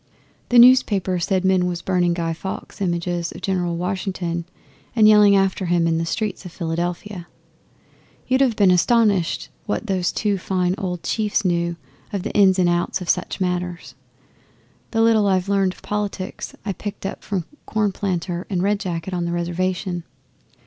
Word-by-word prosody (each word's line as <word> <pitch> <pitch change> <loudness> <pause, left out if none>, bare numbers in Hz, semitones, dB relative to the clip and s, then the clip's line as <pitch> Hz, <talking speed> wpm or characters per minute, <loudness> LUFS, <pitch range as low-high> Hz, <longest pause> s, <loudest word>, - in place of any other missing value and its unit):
The 245 - +4
newspaper 210 -7 +5
said 190 +2 0
men 185 -1 +3
was 175 -1 -4
burning 175 -2 +1
Guy 165 -1 -1
Fawkes 190 +4 -7
images 175 -1 -1
of - - -11
General 175 -3 -1
Washington 180 -2 -3 0.5
and 215 -2 +6
yelling 210 -1 +7
after 195 -1 +1
him 170 -1 +2
in 165 -1 +1
the 165 - -2
streets 205 +3 -2
of 180 - -9
Philadelphia. 175 +2 -4 1.0
You'd 260 +1 +2
have 255 -5 +3
been 200 -3 +4
astonished 200 -1 +2 0.2
what 210 - -2
those 185 -4 0
two 205 0 0
fine 180 -1 0
old 180 -4 -4
chiefs 210 -1 0
knew 170 -1 0 0.4
of 200 -4 -3
the - - -4
ins 195 -2 +5
and 180 -2 +3
outs 175 +2 0
of 180 -3 -7
such 180 - -3
matters. 180 -1 -3 1.0
The 225 - 0
little 220 -2 +4
I've 190 0 +1
learned 195 -2 +2
of - - -20
politics 205 -2 -4
I 200 - -1
picked 200 +2 -7
up 195 - -5
from 190 -5 -3 0.2
Cornplanter 190 -4 -1
and 185 -3 -1
Red 200 +1 +1
Jacket 180 -1 -4
on 175 -1 -1
the 170 - -2
Reservation. 175 +1 -2
185 Hz, 165 wpm, -22 LUFS, 175-200 Hz, 1.0 s, yelling